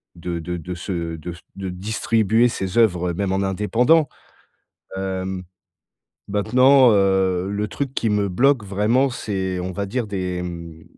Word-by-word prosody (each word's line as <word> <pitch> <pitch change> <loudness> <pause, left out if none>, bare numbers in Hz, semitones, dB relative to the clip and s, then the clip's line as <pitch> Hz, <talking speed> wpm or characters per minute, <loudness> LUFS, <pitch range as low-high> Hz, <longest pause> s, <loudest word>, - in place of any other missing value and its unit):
de 85 0 -4
de 90 +2 -4
de 90 +2 -6
se 85 -2 -4
de 85 +3 -7
s 85 - -11 0.2
de 95 -1 -4
distribuer 110 +4 +1
ses 95 -3 -3
œuvres 90 -6 +3
même 95 +2 -2
en 95 - 0
indépendant. 120 - +2 0.9
Hem, 95 -1 -3 0.9
maintenant, 125 +5 +5
heu, 95 -2 +2
le 105 +1 -2
truc 135 +6 -4
qui 115 - 0
me 105 -1 +1
bloque 125 +3 +3
vraiment, 110 +8 +1
c'est, 95 -6 -3
on 90 +1 -4
va 100 +2 -3
dire, 120 +2 -2
des, 90 -3 -3
mmh, 85 -2 -8
95 Hz, 155 wpm, -22 LUFS, 90-110 Hz, 0.9 s, maintenant